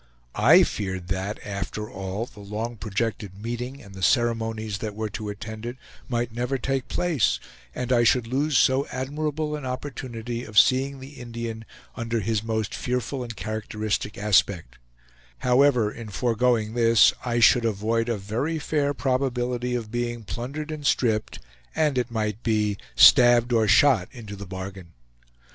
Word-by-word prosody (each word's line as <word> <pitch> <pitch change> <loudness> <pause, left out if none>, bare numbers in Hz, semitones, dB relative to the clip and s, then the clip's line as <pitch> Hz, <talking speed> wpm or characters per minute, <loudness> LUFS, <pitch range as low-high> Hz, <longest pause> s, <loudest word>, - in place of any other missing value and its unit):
I - - +6
feared 95 -3 -3
that, 95 +2 -2
after 105 +1 -4
all, 95 +3 -4
the 110 - -16
long 105 +4 -4
projected 105 -2 -3
meeting 120 +4 -5
and 100 -2 -13
the 95 - -9
ceremonies 110 -1 +1
that 105 -1 -5
were 110 -1 -3
to 105 0 -5
attend 110 +1 -7
it 120 +2 -5 0.3
might 120 -1 -1
never 125 +3 -1
take 135 +1 -2
place, 170 -9 +1 0.4
and 125 0 -1
I 120 -1 +4
should 120 +1 +3
lose 135 +4 +1
so 130 +2 +3
admirable 150 +3 -3
an 150 - -6
opportunity 125 -3 -5
of 110 -3 -8
seeing 135 +3 +4
the 135 +1 -11
Indian 115 -2 -6 0.3
under 115 -1 -2
his 110 +1 0
most 110 -2 -2
fearful 125 +2 -2
and 120 -2 -6
characteristic 110 0 -3
aspect; 100 -9 +1 0.6
however, 125 - +3
in 115 -1 -9
foregoing 115 0 +1
this, 115 -1 +5
I 120 -1 0
should 120 +1 +6
avoid 115 +2 0
a 115 - 0
very 115 +12 -2
fair 145 -2 0
probability 125 -2 -1
of 110 -3 -4
being 120 -1 -3
plundered 130 - -5
and 155 -1 -6
stripped, 110 - +1 0.4
and, 150 -3 +2
it 120 - -2
might 110 -1 -2
be, 105 -3 +1 0.2
stabbed 120 0 +7
or 110 -2 +3
shot 115 -5 +5
into 110 -6 -9
the 100 0 -9
bargain. 95 -2 -8
115 Hz, 155 wpm, -25 LUFS, 105-125 Hz, 0.6 s, stabbed